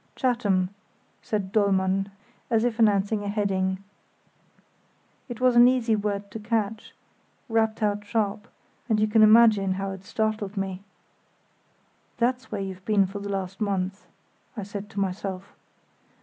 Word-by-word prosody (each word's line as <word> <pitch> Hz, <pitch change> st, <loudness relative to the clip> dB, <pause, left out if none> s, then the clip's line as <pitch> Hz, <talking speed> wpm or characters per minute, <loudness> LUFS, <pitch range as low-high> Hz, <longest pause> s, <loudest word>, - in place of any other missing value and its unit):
"Chatham," 205 Hz, -8 st, +1 dB, 0.5 s
said 200 Hz, -3 st, -3 dB
Dollmann, 195 Hz, -2 st, +2 dB, 0.4 s
as 225 Hz, -2 st, +2 dB
if 240 Hz, -1 st, -1 dB
announcing 205 Hz, -1 st, +3 dB
a -, -, -4 dB
heading. 190 Hz, -2 st, -1 dB, 1.5 s
It 240 Hz, -, -6 dB
was 250 Hz, -1 st, +3 dB
an 240 Hz, +1 st, +8 dB
easy 250 Hz, -3 st, +2 dB
word 205 Hz, -1 st, -3 dB
to 225 Hz, -, -6 dB
catch, 220 Hz, 0 st, -2 dB, 0.5 s
rapped 220 Hz, -2 st, 0 dB
out 205 Hz, 0 st, 0 dB
sharp, 210 Hz, 0 st, -2 dB, 0.4 s
and 220 Hz, -2 st, +2 dB
you 215 Hz, -, +4 dB
can 220 Hz, +1 st, +4 dB
imagine 215 Hz, -3 st, +6 dB
how 195 Hz, +1 st, -3 dB
it 190 Hz, -1 st, -8 dB
startled 215 Hz, -1 st, -2 dB
me. 195 Hz, -1 st, -3 dB, 1.4 s
"That's 250 Hz, +1 st, -1 dB
where 205 Hz, -2 st, -3 dB
you've 190 Hz, -1 st, -6 dB
been 205 Hz, -1 st, +3 dB
for 195 Hz, +2 st, -6 dB
the 200 Hz, 0 st, -6 dB
last 195 Hz, 0 st, -4 dB
month!" 195 Hz, -1 st, -2 dB, 0.5 s
I 210 Hz, -, -3 dB
said 200 Hz, +1 st, -7 dB
to 205 Hz, -, -5 dB
myself. 190 Hz, 0 st, -3 dB
205 Hz, 140 wpm, -26 LUFS, 195-220 Hz, 1.5 s, an